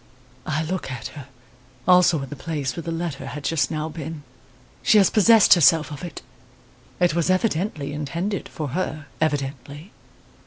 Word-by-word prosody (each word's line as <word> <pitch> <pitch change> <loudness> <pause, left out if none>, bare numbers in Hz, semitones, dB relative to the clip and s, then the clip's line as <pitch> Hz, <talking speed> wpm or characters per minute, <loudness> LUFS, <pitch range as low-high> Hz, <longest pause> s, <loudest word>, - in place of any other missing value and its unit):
I 155 +1 -1
look 180 -2 -4
at 130 -3 -6
her, 140 -3 -11 0.6
also 180 -5 +5
at 135 - -9
the - - -5
place 145 -2 -3
where 170 - -4
the 165 - -5
letter 165 -3 -4
had 145 -1 -7
just 160 0 +1
now 155 -1 -3
been. 160 -1 -7 0.6
She 215 - +4
has 195 -3 +5
possessed 225 0 +6
herself 160 -1 +4
of 145 - -8
it; 175 -5 -7 0.8
it 175 -3 +3
was 170 +1 0
evidently 185 -6 0
intended 170 +7 -3
for 150 -3 -5
her 155 0 -3 0.2
evidently. 145 - -3
160 Hz, 160 wpm, -23 LUFS, 145-175 Hz, 0.8 s, possessed